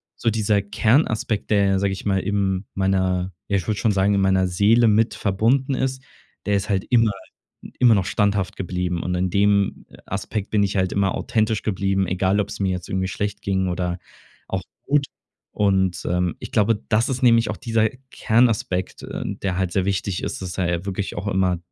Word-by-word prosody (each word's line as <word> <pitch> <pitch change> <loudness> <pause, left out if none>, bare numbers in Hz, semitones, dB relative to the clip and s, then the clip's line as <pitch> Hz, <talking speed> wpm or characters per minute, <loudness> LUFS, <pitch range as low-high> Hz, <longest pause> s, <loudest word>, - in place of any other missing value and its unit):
so 115 - 0
dieser 105 -1 +1
Kernaspekt, 110 0 +1
der 100 -2 +4
ja, 95 -1 +2
sage 100 0 0
ich 95 - -8
mal, 95 -2 +2
im 95 0 -1
meiner 95 -1 0 0.2
ja, 100 - +1
ich 90 - -3
würde 105 -2 -1
schon 110 - +2
sagen, 100 +1 +2
in - - +2
meiner 95 -1 +3
Seele 105 +6 +4
mit 110 +1 +2
verbunden 115 +7 +1
ist, 130 0 -2 0.4
der 105 - +2
ist 100 +1 -2
halt 95 -2 0
immer 115 -3 +4 0.7
immer 120 -3 +6
noch 95 -3 +1
standhaft 100 -2 0
geblieben. 90 -1 -2
Und 90 - -2
in 90 +1 0
dem 100 +1 +1 0.2
Aspekt 100 +1 -4
bin 105 -1 +2
ich 100 0 0
halt 95 -1 +1
immer 100 -2 +1
authentisch 110 -1 0
geblieben, 95 -2 0
egal 95 +3 +1
ob's 100 - -4
mir 95 -1 +1
jetzt 90 -1 -4
irgendwie 95 0 -1
schlecht 100 +2 -4
ging 95 -1 0
oder 90 0 -2 0.5
auch - - -2 0.2
gut. 145 0 +1 0.5
Und, 95 -3 +1
ähm, 90 0 0
ich - - -9
glaube, 105 -1 +2
das 110 +1 +2
ist 130 -1 -2
nämlich 115 -2 +4
auch - - -4
dieser 115 -2 +1 0.2
Kernaspekt, 110 -6 +1
äh, - - -5
der 95 -2 -3
halt 95 -2 -1
sehr 95 - +1
wichtig 95 -1 -2
ist, - - -4
dass 90 -1 -5
er 90 -2 +1
ja 85 +2 -3
wirklich 100 0 -3
auch 100 - -4
immer, 95 -2 +1
100 Hz, 195 wpm, -22 LUFS, 95-110 Hz, 0.7 s, immer